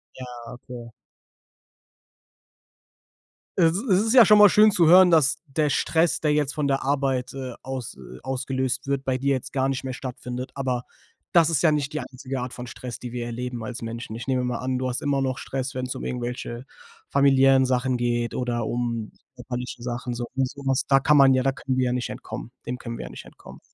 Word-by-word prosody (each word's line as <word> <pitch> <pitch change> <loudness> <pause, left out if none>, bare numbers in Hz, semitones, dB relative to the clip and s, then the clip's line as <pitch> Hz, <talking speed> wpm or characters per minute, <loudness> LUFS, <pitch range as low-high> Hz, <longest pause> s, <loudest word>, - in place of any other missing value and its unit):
Ja, 130 - -8 0.3
okay. 125 -1 -10 2.7
Es 165 -3 +5
es 200 -4 +2
ist 225 - +2
ja 245 -3 +9
schon 210 +2 +7
mal 210 0 +9
schön 215 +3 +6
zu 175 -5 +3
hören, 180 +2 +8
dass 150 -4 +4
der 150 +2 0
Stress, 160 +4 +1
der 150 -2 +1
jetzt 150 -1 0
von 150 -2 -1
der 135 -1 0
Arbeit, 135 -2 0
äh, 130 -2 -6
aus 130 -3 -6 0.3
ausgelöst 130 0 -2
wird, 140 -1 -1
bei 130 -1 0
dir 140 +2 +1
jetzt 130 - -6
gar 135 0 +1
nicht 135 -1 -2
mehr 130 -1 -4
stattfindet, 125 0 -6
aber 130 -3 -2 0.5
das 170 -2 +5
ist 155 - +1
ja 160 - +4
nicht 150 -1 -1
die 155 - -1
einzige 130 0 -6
Art 125 0 -5
von 125 - -7
Stress, 125 -1 -7
die 125 - -8
wir 120 -1 -4
erleben 120 0 -5
als 115 +1 -6
Menschen. 115 -1 -6
Ich 115 - -6
nehme 130 -1 +1
mal 125 -1 -2
an, 130 0 -2
du 130 0 -1
hast 125 - -3
immer 140 -1 0
noch 130 -1 -1
Stress, 135 +1 -4
wenn's 130 0 -3
um - - -6
irgendwelche 120 0 -4 0.4
familiären 135 -1 +5
Sachen 125 0 +1
geht 120 -1 -1
oder 120 -2 -2
um 115 -2 -2 0.2
körperliche 125 0 -6
Sachen 120 0 -4
so 120 0 -3
und 130 -1 +1
so 140 - -11
was. 135 -1 +1
Da 135 -1 +5
kann 150 +2 +4
man 135 -1 +7
ja 130 - +1
da 135 - +2
können 135 -1 -3
wir 130 - +2
ja 125 - 0
nicht 125 -1 -2
entkommen 120 - -7
dem 125 - -3
können 115 -1 -6
wir - - -6
ja - - -7
nicht - - -10
entkommen. - - -14
130 Hz, 210 wpm, -24 LUFS, 125-140 Hz, 2.7 s, ja